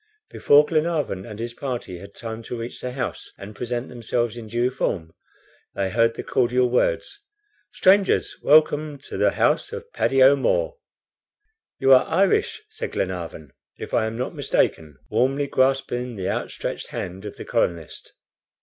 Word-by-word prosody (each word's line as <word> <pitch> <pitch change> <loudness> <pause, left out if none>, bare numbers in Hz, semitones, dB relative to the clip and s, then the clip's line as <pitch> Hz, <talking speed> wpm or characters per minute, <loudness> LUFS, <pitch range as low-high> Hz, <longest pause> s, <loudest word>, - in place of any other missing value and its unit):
Before 145 +1 +5
Glenarvan 155 - -1
and 105 -2 -8
his 115 +1 -5
party 120 -9 -5
had 100 +2 -12
time 115 -1 -6
to 120 - -4
reach 115 +1 -7
the 125 0 -4
house 130 -2 -4
and 100 +2 -10
present 120 +2 -3
themselves 120 -1 -2
in 115 -2 -8
due 120 +3 0
form, 80 -10 -2 0.6
they 95 -1 -1
heard 115 +2 +2
the - - -5
cordial 125 0 +1
words: - - 0 0.5
"Strangers! 195 +1 +3
welcome 150 0 +4
to 135 - -10
the - - +3
house - - +1
of 470 +1 -8
Paddy 135 -1 +3
O'Moore!" - - +3 1.0
"You 135 0 +5
are 130 - +5
Irish," 185 +3 +1
said - - -6
Glenarvan, 85 -6 -4 0.2
"if - - -8
I 110 - +2
am 110 +1 -5
not 125 - -3
mistaken," 75 -4 0
warmly 135 +3 +1
grasping 130 -2 0
the 95 -2 -3
outstretched - - -4
hand 90 +2 -6
of 105 - -8
the - - -8
colonist. 85 -2 -2
125 Hz, 155 wpm, -23 LUFS, 105-140 Hz, 1.0 s, Before